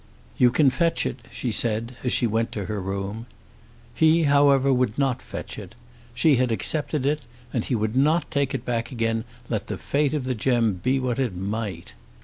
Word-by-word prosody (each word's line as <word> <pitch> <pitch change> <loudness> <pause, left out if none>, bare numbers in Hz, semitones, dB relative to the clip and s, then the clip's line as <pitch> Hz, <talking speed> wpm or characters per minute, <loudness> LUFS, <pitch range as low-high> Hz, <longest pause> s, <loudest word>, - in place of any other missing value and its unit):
"You 125 - +6
can 135 +2 +4
fetch 165 +6 +1
it," 130 - -3
she 120 - -3
said, 115 +2 0
as 125 - 0
she 125 - +2
went 115 +1 0
to 100 -3 -3
her 105 +1 -3
room. 100 +4 -4 0.7
He 160 +6 +4
however 140 -2 +4
would 125 -4 0
not 135 -3 +1
fetch - - -7
it. - - -11 0.4
She 150 -5 +4
had 125 -1 +1
accepted 145 +4 0
it, 150 +2 +1 0.3
and 115 - 0
he 125 - 0
would 110 +1 -1
not 150 +4 +2
take 140 -3 0
it 130 - -5
back 115 0 -2
again, 115 -2 -1 0.2
let - - -3
the - - -4
fate 145 +1 0
of 145 - -1
the 130 0 -1
gem 120 -2 +1
be 130 +2 +1
what 125 -1 -1
it 125 -8 -1
might. 100 -2 -4
125 Hz, 195 wpm, -24 LUFS, 115-140 Hz, 0.7 s, You